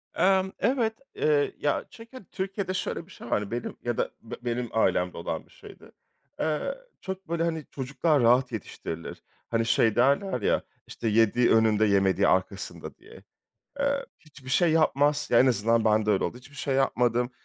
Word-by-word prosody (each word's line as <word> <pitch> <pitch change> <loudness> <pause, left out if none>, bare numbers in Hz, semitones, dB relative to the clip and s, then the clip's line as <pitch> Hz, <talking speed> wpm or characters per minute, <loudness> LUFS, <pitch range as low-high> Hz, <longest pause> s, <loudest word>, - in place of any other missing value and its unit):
Emm, 190 +1 +3
evet, 230 -1 +1 0.2
eee, 145 -2 +2
ya, 145 -1 -1
çünkü 230 0 -13
Türkiye'de 195 -1 -3
şöyle 175 - -3
bir 185 - -19
şey 120 - -11
var, 105 -2 -1
benim 120 0 -4
ya 120 -1 -2
da - - -1
be 115 - -8
benim 120 0 -2
ailemde 90 -5 +1
olan 85 - -4
bir - - -26
şeydi. - - -15 0.5
Eee, 155 - -1 0.3
çok, 190 0 -6
böyle, 170 0 0
hani, 160 -3 -2
çocuklar 145 +2 0
rahat 125 +1 +4
yetiştirilir. 85 -6 -7 0.3
Hani, 115 -1 +1
şey 110 -1 +3
derler 140 - +2
ya, - - +2 0.3
işte, 115 - -5
yediği 115 +2 +3
önünde 110 -1 +4
yemediği 100 -2 +3
arkasında 95 0 -2
diye. - - -16 0.6
Eee, 280 0 0
hiçbir 140 -4 -14
şey 170 +5 +3
yapmaz. 150 -2 +2
Ya, 120 - +6
en 130 - +6
azından 115 -1 +2
bende 110 0 +3
öyle 100 - +1
oldu. 125 - -3
Hiçbir 140 +3 -16
şey 135 -1 -1
yapmadım. 125 -2 +1
130 Hz, 170 wpm, -27 LUFS, 115-165 Hz, 0.6 s, Ya